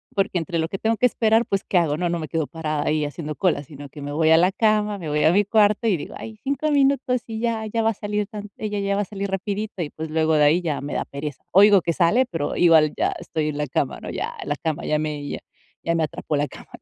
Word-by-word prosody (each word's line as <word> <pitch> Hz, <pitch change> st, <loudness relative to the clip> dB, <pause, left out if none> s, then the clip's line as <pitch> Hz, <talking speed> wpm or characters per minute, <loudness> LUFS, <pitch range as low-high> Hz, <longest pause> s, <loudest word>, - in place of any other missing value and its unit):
Porque 195 Hz, -2 st, +1 dB
entre 165 Hz, +1 st, -3 dB
lo 160 Hz, -, 0 dB
que 195 Hz, -, -4 dB
tengo 225 Hz, +1 st, +1 dB
que 250 Hz, -, +3 dB
esperar, 225 Hz, 0 st, +2 dB
pues, 195 Hz, 0 st, -1 dB
¿qué 185 Hz, -, +1 dB
hago? 155 Hz, -4 st, +2 dB
¿No? 175 Hz, +1 st, -1 dB
No 170 Hz, 0 st, -1 dB
me 155 Hz, -, -5 dB
quedo 160 Hz, -3 st, -1 dB
parada 155 Hz, -2 st, -3 dB
ahí 155 Hz, 0 st, +1 dB
haciendo 150 Hz, +1 st, -5 dB
cola, 175 Hz, -5 st, +1 dB
sino 145 Hz, -1 st, -11 dB
que 150 Hz, -, -11 dB
me 145 Hz, 0 st, -5 dB
voy 160 Hz, +1 st, +2 dB
a 160 Hz, -, +7 dB
la 180 Hz, +3 st, +4 dB
cama, 210 Hz, 0 st, +1 dB
me 165 Hz, -4 st, -5 dB
voy 150 Hz, 0 st, +1 dB
a 160 Hz, -, +6 dB
mi 205 Hz, +2 st, +4 dB
cuarto 210 Hz, +1 st, +3 dB
y 200 Hz, -5 st, +3 dB
digo: -, -, -8 dB
"Ay, 220 Hz, -1 st, -9 dB
5 280 Hz, +3 st, -1 dB
minutos 270 Hz, -3 st, +2 dB
y 220 Hz, -1 st, -5 dB
ya 230 Hz, -2 st, -1 dB
ya 225 Hz, +1 st, -1 dB
va 220 Hz, -, +3 dB
a -, -, -5 dB
salir 205 Hz, 0 st, -2 dB
tan 210 Hz, 0 st, -8 dB
ella 210 Hz, -1 st, -3 dB
ya 200 Hz, 0 st, 0 dB
va 205 Hz, -, +1 dB
a -, -, -7 dB
salir 200 Hz, 0 st, -5 dB
rapidito". 200 Hz, 0 st, -3 dB
Y, 150 Hz, -, -5 dB
pues, 160 Hz, 0 st, -6 dB
luego 160 Hz, 0 st, +2 dB
de 150 Hz, -, +4 dB
ahí 160 Hz, +5 st, +4 dB
ya 160 Hz, -4 st, -2 dB
me 145 Hz, -, -5 dB
da -, -, 0 dB
pereza. 140 Hz, 0 st, -7 dB
Oigo 200 Hz, 0 st, +7 dB
que 170 Hz, -, 0 dB
sale, 190 Hz, +10 st, +3 dB
pero 165 Hz, -9 st, -3 dB
igual 160 Hz, -3 st, +5 dB
ya -, -, +1 dB
estoy 155 Hz, -1 st, -2 dB
en 145 Hz, -, -4 dB
la 150 Hz, -, -1 dB
cama, -, -, -1 dB
¿no? -, -, -7 dB
Ya, -, -, -4 dB
la 145 Hz, -, -1 dB
cama, 160 Hz, +1 st, -3 dB
ya 150 Hz, -, +1 dB
me 150 Hz, -2 st, -3 dB
ya -, -, -4 dB, 0.4 s
ya 170 Hz, 0 st, 0 dB
me 165 Hz, -, +1 dB
atrapó 155 Hz, 0 st, -3 dB
la 145 Hz, +1 st, 0 dB
cama, -, -, -13 dB
¿no? -, -, -18 dB
175 Hz, 285 wpm, -23 LUFS, 155-210 Hz, 0.4 s, a